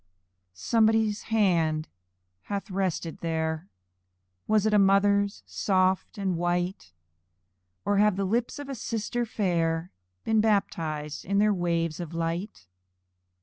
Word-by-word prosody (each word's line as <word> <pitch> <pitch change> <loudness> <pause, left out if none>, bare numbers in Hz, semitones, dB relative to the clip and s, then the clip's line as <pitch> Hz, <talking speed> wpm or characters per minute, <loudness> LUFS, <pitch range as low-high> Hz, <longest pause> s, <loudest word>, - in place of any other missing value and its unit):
Somebody's 220 - +2
hand 165 -8 +2 0.6
hath 200 0 -4
rested 185 -4 -2
there; 160 +1 -2 0.8
Was 215 -1 +3
it 215 - +2
a 210 - +6
mother's, 200 +1 +3
soft 185 0 0
and 190 -4 -1
white? 175 - -1 0.9
Or 205 0 +2
have 210 -1 +4
the 195 0 -1
lips 235 +5 -1
of 290 -1 -7
a 275 - -4
sister 235 0 -3
fair 170 -5 0 0.3
Been 220 -1 +3
baptized 160 -8 -1
in 200 +2 -1
their 210 +1 +4
waves 170 -3 -1
of 170 -1 -6
light? 165 - -3
190 Hz, 120 wpm, -27 LUFS, 165-210 Hz, 0.9 s, a